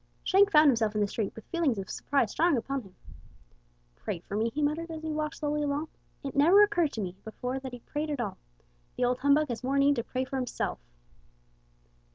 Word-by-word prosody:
Shank 395 +1 +5
found 305 -4 +7
himself 225 -4 +1
in 210 - +1
the 205 - +2
street 205 0 -3
with 225 - -11
feelings 330 - +1
of 195 -1 -4
surprise 275 -7 0
strong 335 -4 +2
upon 275 +3 -2
him. 195 -5 -17 1.0
"Pray 205 - -4
for 200 - -7
me!" 220 +2 +1
he 280 - -5
muttered, 315 +3 -1
as 320 -1 -7
he 315 - -3
walked 305 0 -2
slowly 300 0 -1
along. 290 +2 -1 0.3
"It 275 - -5
never 345 +9 +7
occurred 350 -8 +1
to 220 - -3
me 180 -2 -4
before 250 +4 -4
that 265 -1 -7
he 245 -1 -9
prayed 300 +5 -4
at 290 -3 -2
all! 210 -5 -3 0.6
The 250 - +2
old 245 +1 0
humbug 285 +2 +3
has 235 0 -4
more 270 +2 0
need 280 0 +4
to 235 - 0
pray 255 +2 -3
for 270 +1 -4
himself!" 250 -2 -3
275 Hz, 215 wpm, -29 LUFS, 235-305 Hz, 1.0 s, found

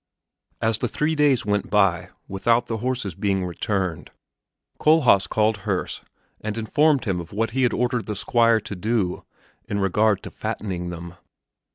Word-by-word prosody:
As 110 0 +2
the 120 - 0
three 150 +8 0
days 145 -6 +2
went 105 -1 0
by 100 -5 +2 0.2
without 115 +5 +1
the 115 -1 -3
horses 120 -4 -2
being 95 +1 -1
returned, 90 -1 -2 0.7
Kohlhaas 130 - +4
called 110 0 +2
Herse 100 -2 -3 0.4
and 110 0 -4
informed 140 +6 +2
him 95 -4 -1
of 85 - -11
what 115 +3 -1
he 130 +2 -1
had 125 -2 +3
ordered 125 0 -1
the 105 - -3
Squire 115 +2 +3
to 100 - -6
do 105 -1 -1 0.4
in 100 - -2
regard 100 +1 +2
to - - -8
fattening 95 -5 -4
them. 85 0 -8
105 Hz, 160 wpm, -23 LUFS, 95-120 Hz, 0.7 s, Kohlhaas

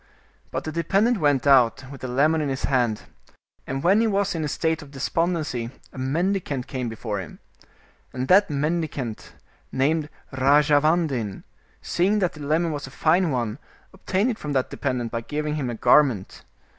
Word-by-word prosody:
But - - -4
the 155 - -4
dependent 195 +8 +1
went 145 -4 +2
out, 130 -3 +4
with 135 - -10
the 130 - -4
lemon 150 +6 +2
in 145 - -1
his 135 0 -3
hand, 120 -5 +1 0.6
and 135 +1 -3
when 195 +5 +4
he 230 - +2
was 200 -1 +1
in 165 -2 -2
a - - -1
state 160 +2 -1
of 145 - -12
despondency, 150 -3 -1 0.2
a - - -8
mendicant 150 -1 -1
came 125 -3 -4
before 110 -2 -4
him. 90 - -8 0.7
And 130 +1 -3
that 200 +2 +5
mendicant, 145 -5 -3 0.4
named 150 +3 +1 0.2
Rajavandin, 145 - +2 0.4
seeing 195 +5 +1
that 185 -4 0
the 150 - -12
lemon 160 +3 +1
was 145 -1 -5
a - - -9
fine 170 +2 +2
one, 120 -2 -2 0.3
obtained 190 +5 0
it 225 - -6
from 150 -1 -4
that 130 -2 0
dependent 125 -4 -2
by 115 - -2
giving 150 +4 -3
him 145 -5 -2
a 120 - -3
garment. 120 -6 +2
145 Hz, 170 wpm, -24 LUFS, 130-165 Hz, 0.7 s, that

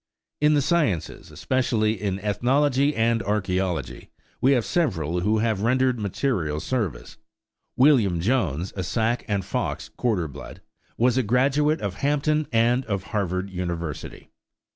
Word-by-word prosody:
In 150 0 +4
the 145 - +2
sciences, 145 - -1
especially 110 -5 0
in 100 -2 -1
ethnology 135 +7 +1
and 115 0 +2
archæology, 95 -6 -2 0.3
we 135 +2 +5
have 120 -4 +1
several 90 - 0
who 105 +5 +1
have 110 -2 0
rendered 125 +2 +2
material 95 - -1
service. 110 - -3 0.6
William 125 - +4
Jones, 95 - 0
a 95 - -3
Sac 110 +7 -1
and 100 -4 -1
Fox - - -3
quarter 105 -9 -1
blood, 70 -2 -10 0.4
was 125 +2 +3
a - - +4
graduate 140 +7 +2
of 100 -2 -4
Hampton 150 +3 +1
and 120 +2 +2
of 100 -4 -2
Harvard 95 -2 -1
University. 85 -4 -5
110 Hz, 135 wpm, -24 LUFS, 95-130 Hz, 0.6 s, we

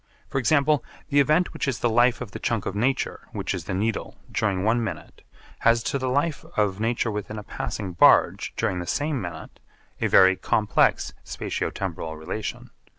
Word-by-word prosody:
For 135 - 0
example, 145 +3 +3 0.3
the 145 - +3
event 155 +5 +3
which - - -3
is 130 -3 0
the - - +1
life 120 +2 +3
of 105 - -6
the - - -7
chunk 115 -4 -1
of - - -2
nature 130 +5 -1
which - - -2
is - - -5
the - - -3
Needle 110 +3 -2 0.2
during 100 -4 0
one 115 +2 +2
minute 90 -8 -6 0.4
has 115 0 +3
to 140 - -1
the 130 0 -1
life 145 +3 0
of 105 -2 +1
nature 115 +1 0
within 105 +1 -5
a 105 - -6
passing 100 -2 -5
barge 85 - +4
during 90 - 0
the 90 - -5
same 145 -3 -1
minute 85 -3 -8 0.4
a - - +2
very 95 0 +6
complex 105 +3 +1
spatio - - -3
temporal 80 -4 -5
relation. 100 +7 -5
110 Hz, 185 wpm, -25 LUFS, 95-130 Hz, 0.4 s, very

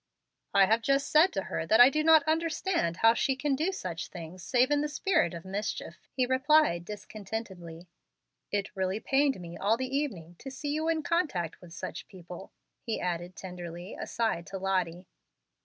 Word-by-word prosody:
"I 195 - +7
have 225 +4 +2
just 275 +4 +1
said 315 +5 +6
to 195 - -1
her 165 - -4
that 220 - +4
I 245 +2 +9
do 305 +1 0
not 320 -1 +7
understand 320 - 0
how 225 +3 +6
she 265 +3 +1
can 275 +1 0
do 320 +7 0
such 180 - -5
things 175 +1 -9
save 255 +7 +2
in 290 0 +3
the 300 - -1
spirit 315 - +1
of 170 - -9
mischief," 200 +3 -5
he 255 - +1
replied, 260 - +3
discontentedly. 190 -4 -7 0.6
"It 205 0 -2
really 190 +2 -1
pained 270 -1 +1
me 170 -1 -8
all 215 +3 +2
the 260 +2 -3
evening 180 - -3
to 270 - -7
see 285 +2 -5
you 310 +2 -1
in 325 -2 0
contact 290 - -1
with 175 -2 -13
such - - -6
people," 180 -1 -11 0.3
he 225 - -3
added 175 0 -3
tenderly, 175 0 -8
aside 220 -7 -2
to 195 -1 -5
Lottie. 185 -2 -1
215 Hz, 180 wpm, -29 LUFS, 180-285 Hz, 0.6 s, I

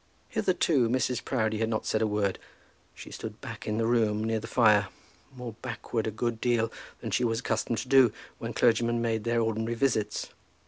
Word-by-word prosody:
Hitherto 150 -9 +2
Mrs. 125 0 0
Proudie 110 -4 0
had 115 0 0
not 110 -1 -1
said 110 - 0
a 110 - +3
word. 105 -2 0 0.6
She - - -10
stood - - -7
back - - -8
in 105 0 -1
the 115 - +1
room, 110 -2 +2
near 110 0 0
the 115 - -7
fire, 110 -4 +4 0.4
more 125 -3 -7
backward 115 -2 -3
a - - -1
good 115 +1 -2
deal 115 -2 +1 0.3
than - - -4
she - - +1
was 115 0 0
accustomed 115 - -1
to - - -4
do 130 -4 +6 0.3
when 115 0 -4
clergymen 120 0 +3
made 115 -2 -1
their 115 0 +2
ordinary 110 +1 -1
visits. 115 -4 0
115 Hz, 190 wpm, -28 LUFS, 110-120 Hz, 0.6 s, do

